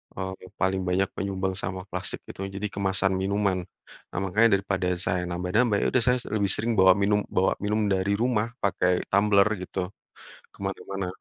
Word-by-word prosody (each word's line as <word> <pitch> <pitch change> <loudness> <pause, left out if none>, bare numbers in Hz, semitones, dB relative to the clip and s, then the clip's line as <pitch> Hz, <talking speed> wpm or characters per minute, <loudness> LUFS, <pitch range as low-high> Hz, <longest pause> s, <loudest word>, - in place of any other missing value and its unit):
mmm, 95 0 -3 0.3
paling 95 0 +2
banyak 95 +1 +1
menyumbang 95 -1 -2
sama 95 -1 -4
plastik 90 +1 -5
itu. - - -10 0.2
Jadi 105 - -2
kemasan 95 -1 0
minuman, 100 -1 +1 0.6
nah - - -1
makanya 110 +5 +4
daripada 95 -2 -1 0.2
saya 90 0 0
nambah-nambah 95 +6 +1
yaudah 130 - +2
saya 125 0 +4 0.2
lebih 100 -3 +1
sering 115 +2 0
bawa 95 0 +8
minum 100 +2 +2
bawa 95 +1 +2
minum 105 +1 +1
dari 95 +1 +1
rumah 115 -1 +1 0.2
pakai 90 -2 +1
tumbler 100 0 +5
gitu, 90 0 -3 0.7
kemana-mana 95 0 -4
95 Hz, 155 wpm, -26 LUFS, 95-105 Hz, 0.7 s, bawa